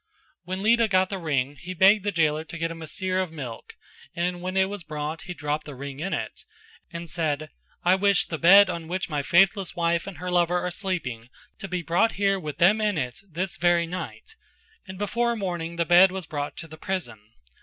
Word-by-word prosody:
When 185 +2 -4
Lita 230 +1 +4
got 185 -2 +2
the 195 - -4
ring 145 -4 -1
he 185 +1 -7
begged 195 +3 +5
his 205 -3 -1
jailer 155 -1 +2
to 165 +1 -8
get 165 0 -2
him 165 0 -8
a 160 - -7
seer 185 +4 -2
of 185 -3 -4
milk 130 -8 -8 0.4
and 175 +1 -1
when 185 +1 -3
it 190 0 +4
was 200 0 -6
brought 155 +1 -5
he 180 - -5
dropped 150 0 -3
the 145 - -8
ring 140 +1 -7
in 185 +5 -3
it, - - -4 0.5
and 170 0 -7
said 155 -2 -2 0.3
"I 180 - +5
wish 200 0 +3
the 160 - -5
bed 195 +4 +8
on 170 -3 -4
which 180 0 -3
my 145 -1 0
faithless 185 - +3
wife 170 +1 0
and 195 -5 -7
her 180 +3 -4
lover 175 0 +2
are 180 0 -3
sleeping 160 - -4 0.3
to 195 - -6
be 180 -2 -3
brought 175 +8 +2
here 195 0 +1
with 150 -4 -6
them 210 +6 +4
in 210 -4 +1
it 125 +1 -3
this 180 +3 -4
very 175 -1 +3
night" 185 - -7 0.5
and 190 0 -8
before 235 +4 0
morning 175 -5 -3
the 170 0 0
bed 180 +3 +7
was 190 -2 -5
brought 145 -1 -5
to 165 - -7
the 155 0 -12
prison. 170 - -4
175 Hz, 220 wpm, -25 LUFS, 160-190 Hz, 0.5 s, bed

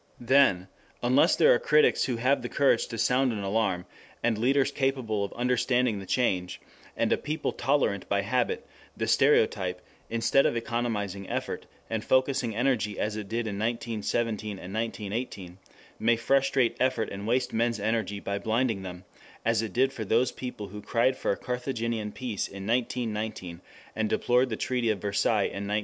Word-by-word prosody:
Then 120 -8 +4 0.4
unless 125 +3 +4
there - - +6
are 120 - +2
critics 150 0 +4
who 125 - -1
have 130 +4 +2
the - - -5
courage 140 -1 +2
to 115 - -6
sound 125 +3 +2
an 105 -3 -4
alarm, 95 -3 0 0.4
and 120 -2 +2
leaders 135 +5 +2
capable 130 -7 -1
of 100 - -4
understanding 125 -2 +1
the 95 - -9
change, 95 -8 0 0.4
and - - +2
a - - +1
people 155 +2 -2
tolerant 135 -8 0
by 100 0 +2
habit, 120 +4 0 0.3
the - - -1
stereotype, 90 -1 +3 0.3
instead 115 +4 +3
of - - -1
economizing 105 -5 -3
effort, - - -4 0.2
and 110 -1 -3
focussing 130 -3 +1
energy 115 -5 0
as 105 0 -1
it 105 -2 -6
did 115 +1 -1
in 100 -2 -4
1917 110 -2 -2
and 95 +1 -9
1918, 105 -4 -4 0.4
may 115 +1 +3
frustrate 130 +1 +2
effort 130 -4 +1
and 100 +2 -6
waste 125 +3 +1
men's 115 0 +1
energy 105 -2 -1
by 100 0 -3
blinding 110 0 0
them, 90 -1 -8 0.4
as 115 -1 +2
it 110 -3 -4
did 130 +5 +2
for 115 - -4
those 115 +4 +2
people 115 -6 -7
who 105 +2 -8
cried 120 +4 +1
for - - -3
a 100 - -1
Carthaginian 115 -4 -3
peace 120 -4 -3
in 95 0 -8
1919 110 -6 -2 0.3
and 110 -1 0
deplored 125 +1 +2
the 110 - -3
Treaty 125 -3 0
of 110 - +1
Versailles 105 +2 +1
in 100 +1 -3
1921. 105 +1 +1
115 Hz, 170 wpm, -28 LUFS, 105-125 Hz, 0.4 s, there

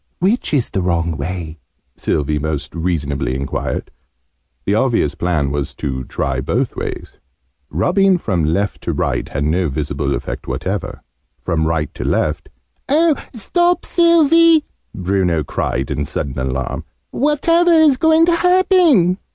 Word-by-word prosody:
"Which 200 +8 0
is 140 -6 0
the 95 - -1
wrong 85 -2 0
way?", 80 +1 -5 0.4
Sylvie 75 0 -1
most 75 -1 -4
reasonably 75 -6 -2
enquired. 70 0 -3 0.7
The - - +1
obvious 115 - +1
plan 75 -5 -1
was 70 -1 -3
to 65 -2 -4
try - - -2
both - - -1
ways. - - -6 0.5
Rubbing 190 - +2
from 95 - -1
left 95 +7 -1
to - - -2
right - - -2
had 70 - -2
no 85 +4 +1
visible 70 -1 -2
effect - - -6
whatever. - - -4 0.4
From 80 -1 -1
right 80 -3 -1
to - - -6
left - - -1 0.4
"Oh, 315 +3 +4 0.2
stop, 345 - +1
Sylvie!" 335 -1 +5 0.3
Bruno 90 -4 0
cried - - -3
in 75 - -1
sudden 70 -2 -4
alarm. 65 0 -3 0.3
"Whatever 330 +5 +2
is 315 -5 +5
going 320 +2 +4
to 340 0 +3
happen?" 350 - +4
90 Hz, 135 wpm, -18 LUFS, -, 0.7 s, Sylvie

